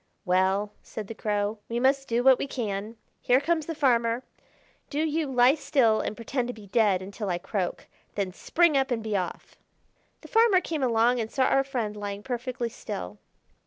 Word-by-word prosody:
"Well," 190 +3 +2
said 220 - -7
the 225 - -7
Crow, 210 0 -2
"we 235 +1 -1
must 270 +2 +2
do 235 +1 +1
what 265 -1 +6
we - - -2
can. 215 -4 -4 0.3
Here 250 +1 +4
comes 320 +1 0
the 330 - -3
farmer. 235 -3 +2 0.7
Do 295 +1 -1
you 315 -1 0
lie 250 0 +5
still 275 -7 +2
and - - -3
pretend 240 +2 -2
to 245 - -5
be 215 -2 -12
dead 200 -3 +2
until 200 +1 -5
I 175 - 0
croak: 190 0 -3 0.3
then 195 -2 -1
spring 335 - +2
up 270 0 +2
and 235 -3 -1
be 215 -2 -2
off." 180 -3 -4 0.6
The - - -12
farmer 450 -4 +5
came 320 -4 -4
along 240 0 +3
and 220 -1 -2
saw 265 - +1
our 270 +1 +3
friend 240 -6 -3
lying 205 0 -5
perfectly 245 0 -3
still. 90 - -7
235 Hz, 190 wpm, -27 LUFS, 205-270 Hz, 0.7 s, what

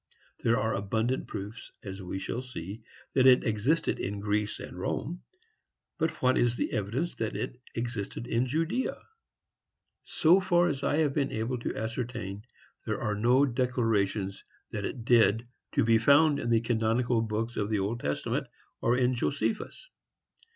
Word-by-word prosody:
There 115 +2 +2
are 110 -3 0
abundant 110 +6 -1
proofs, 105 +4 -7
as 95 -1 -6
we 95 +1 -4
shall 115 +5 -3
see, 110 -5 -7 0.3
that 130 -1 +5
it 130 -1 +7
existed 115 +9 +1
in 100 +1 -3
Greece 105 +1 -1
and - - -8
Rome; 170 +9 -3 0.8
but 160 - -1
what 130 0 +4
is 120 0 +2
the - - -1
evidence 115 - -1
that 110 -1 -2
it 125 0 -4
existed 115 -1 -3
in 120 +1 0
Judea? 165 - -1 1.1
So 170 +4 +4
far 175 -2 +3
as 140 -3 -3
I 140 - +1
have 150 -3 +2
been 140 -2 0
able 115 +3 -2
to - - -3
ascertain, 110 -3 -4 0.4
there - - -2
are 105 - -1
no 120 +6 +4
declarations 115 -6 0 0.3
that - - -3
it 115 - -5
did 115 -1 +4 0.3
to - - +3
be 115 0 +4
found 145 +5 +5
in - - -2
the 115 -1 +4
canonical 115 +1 +1
books 115 +1 -2
of 105 0 -1
the 110 - +1
Old 105 +4 -1
Testament, 75 -6 -2 0.3
or 120 +1 +3
in 125 0 +3
Josephus. 145 - -2
115 Hz, 160 wpm, -29 LUFS, 105-130 Hz, 1.1 s, it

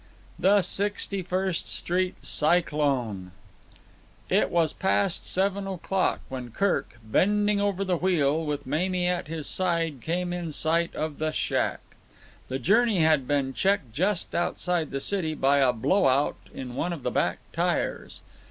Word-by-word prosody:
The 200 +1 +4
Sixty 200 0 -1
First 185 0 -2
Street 180 +1 0
Cyclone 140 - 0 1.0
It - - +3
was 165 -3 +2
past 190 -1 0
seven 195 +1 0
o'clock 190 0 -1
when 130 -2 -6
Kirk, 185 - -1
bending 205 - +2
over 200 -1 0
the 180 -2 +1
wheel, 160 -4 +2
with 150 -2 -3
Mamie 180 +6 0
at 180 -2 -1
his 160 -1 -5
side 165 -7 -1
came 175 +4 -2
in 170 -3 -4
sight 165 +3 0
of 155 -1 -3
the 155 0 0
shack. - - -1 0.7
The 130 - -2
journey 205 - +3
had 155 -5 +3
been 140 -2 0
checked 175 - 0
just 185 - 0
outside 175 -2 0
the 135 - -3
city 160 -1 0
by 140 0 +3
a 130 -2 +4
blow 185 - +2
out 135 +2 0
in 125 -2 -7
one 175 +7 -2
of 155 -7 -7
the - - -1
back - - +1 0.2
tyres. - - -2
170 Hz, 150 wpm, -26 LUFS, 145-190 Hz, 1.0 s, The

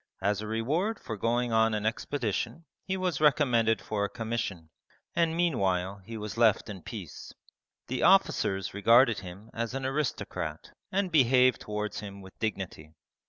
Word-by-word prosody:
As 100 +1 0
a 110 - -5
reward 150 - 0
for 110 - -5
going 120 +3 0
on 110 0 +3
an 105 0 -2
expedition 120 - -2 0.2
he 190 0 -1
was 180 -6 -1
recommended 125 -7 +3
for 105 -1 -2
a 100 - -1
commission, 110 -8 -4 0.4
and 165 -1 +2
meanwhile 100 - 0
he 115 +4 -7
was 105 +1 -6
left 110 -2 +3
in 95 -3 -8
peace. 95 -4 -8 0.5
The - - -3
officers 95 -1 +3
regarded 115 +4 +5
him 100 +4 -10
as 115 +2 -3
an 135 -1 -3
aristocrat 135 +1 -3 0.2
and 190 -1 0
behaved 130 -4 +4
towards 105 0 -3
him 100 -1 -8
with 95 - -13
dignity. 95 -7 -4
115 Hz, 155 wpm, -29 LUFS, 100-135 Hz, 0.5 s, regarded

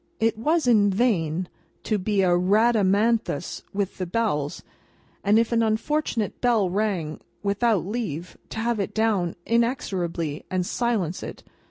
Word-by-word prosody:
It 225 0 +2
was 305 +8 +1
in 215 -4 +5
vain 185 -6 +1 0.4
to 215 -2 0
be 195 +1 +1
a 185 - +3
Rhadamanthus 210 -1 +2
with 200 -1 -3
the 185 - -2
bells, 170 -8 -1 0.6
and 210 +2 +4
if 230 +1 +2
an 230 -1 +3
unfortunate 225 0 -1
bell 225 -7 +2
rang 185 -6 -1 0.2
without 205 -1 +1
leave, 180 -6 -4
to - - -7
have 235 -1 0
it 195 - -3
down 210 -6 +1
inexorably 185 - -1
and 185 -1 0
silence 205 -7 -1
it. - - -8
205 Hz, 140 wpm, -25 LUFS, 180-230 Hz, 0.6 s, in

